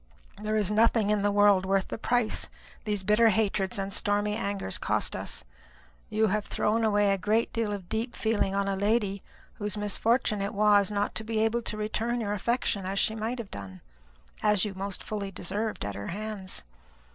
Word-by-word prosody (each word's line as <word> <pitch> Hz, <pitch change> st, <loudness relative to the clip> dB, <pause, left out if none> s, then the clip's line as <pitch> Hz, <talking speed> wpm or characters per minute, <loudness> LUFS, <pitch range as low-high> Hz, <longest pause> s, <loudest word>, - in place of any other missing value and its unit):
There 215 Hz, 0 st, 0 dB
is 210 Hz, -2 st, +2 dB
nothing 220 Hz, -1 st, +3 dB
in 210 Hz, -1 st, +2 dB
the 205 Hz, -, +2 dB
world 205 Hz, -2 st, +5 dB
worth 195 Hz, 0 st, +1 dB
the -, -, -4 dB
price 240 Hz, -1 st, +1 dB, 0.4 s
these 205 Hz, -2 st, -1 dB
bitter 210 Hz, +3 st, +5 dB
hatreds 200 Hz, -3 st, +1 dB
and 195 Hz, 0 st, -3 dB
stormy 205 Hz, +1 st, +1 dB
angers 200 Hz, -, -2 dB
cost -, -, 0 dB
us. -, -, -4 dB, 0.6 s
You 220 Hz, +1 st, +2 dB
have 210 Hz, 0 st, 0 dB
thrown 225 Hz, +2 st, 0 dB
away 205 Hz, -2 st, +3 dB
a 195 Hz, -, -2 dB
great 220 Hz, +4 st, +1 dB
deal 225 Hz, -2 st, -1 dB
of 195 Hz, -3 st, -5 dB
deep 225 Hz, +4 st, -2 dB
feeling 210 Hz, -3 st, 0 dB
on 200 Hz, 0 st, +1 dB
a 195 Hz, -, 0 dB
lady, 200 Hz, -1 st, +1 dB, 0.4 s
whose 210 Hz, 0 st, -3 dB
misfortune 210 Hz, +1 st, +1 dB
it 200 Hz, +1 st, -3 dB
was 205 Hz, -1 st, +4 dB
not 205 Hz, 0 st, -1 dB
to 220 Hz, -, -2 dB
be 225 Hz, 0 st, -3 dB
able 235 Hz, +2 st, 0 dB
to 215 Hz, -, -3 dB
return 225 Hz, +3 st, -1 dB
your 205 Hz, -3 st, -1 dB
affection 210 Hz, -1 st, 0 dB
as 190 Hz, +1 st, -3 dB
she 220 Hz, -, +2 dB
might 225 Hz, +3 st, -2 dB
have 230 Hz, -5 st, -7 dB
done 95 Hz, -2 st, -8 dB, 0.6 s
as 210 Hz, -1 st, +4 dB
you 205 Hz, -, -4 dB
most 195 Hz, 0 st, -4 dB
fully 205 Hz, -2 st, -4 dB
deserved 200 Hz, -, -3 dB
at 100 Hz, -, -3 dB
her 100 Hz, +1 st, -6 dB
hands. 200 Hz, -, -5 dB
210 Hz, 190 wpm, -28 LUFS, 195-220 Hz, 0.6 s, world